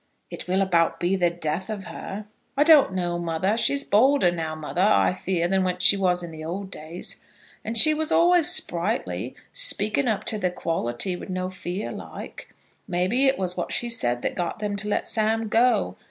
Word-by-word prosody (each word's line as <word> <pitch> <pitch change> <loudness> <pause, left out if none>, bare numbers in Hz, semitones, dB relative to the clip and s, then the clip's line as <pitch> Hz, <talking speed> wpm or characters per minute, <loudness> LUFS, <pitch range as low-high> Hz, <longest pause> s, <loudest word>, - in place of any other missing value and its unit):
"It - - -8
will 190 +2 +1
about 170 -3 +1
be 175 +2 0
the 175 -2 +1
death 170 +1 -4
of 210 -3 -5
her." 205 +2 -8 0.3
"I 290 - +5
don't 300 - +6
know, 175 -2 -2
mother. 175 +4 -1
She's 255 +5 +2
bolder 250 -4 +3
now, 160 -2 -4
mother, 155 +3 -4
I 205 -2 +3
fear, 180 -2 -2
than 190 +1 +1
what 180 0 -2
she 200 - +7
was 180 -2 0
in 160 -2 -8
old 190 +4 -6
days. 165 +3 -7 0.4
And 225 +1 -3
she 310 +7 +8
was 315 0 -3
always 345 -1 +4
sprightly, 180 +7 0 0.2
speaking 280 - +3
up 220 -4 -1
to 215 - -1
the 185 - 0
quality, 165 0 -3
with 175 - -10
no 185 0 -3
fear 185 +2 -5
like. - - -10 0.4
Maybe 185 +9 +1
it 270 - +2
was 180 -1 -2
what 175 - -4
she 215 +8 -2
said 120 - -1
that - - -1
got 175 -1 -4
them 210 -1 -3
to 210 +1 -6
let 205 - -2
Sam 220 0 -1
go. 225 - +1
190 Hz, 195 wpm, -24 LUFS, 175-220 Hz, 0.4 s, she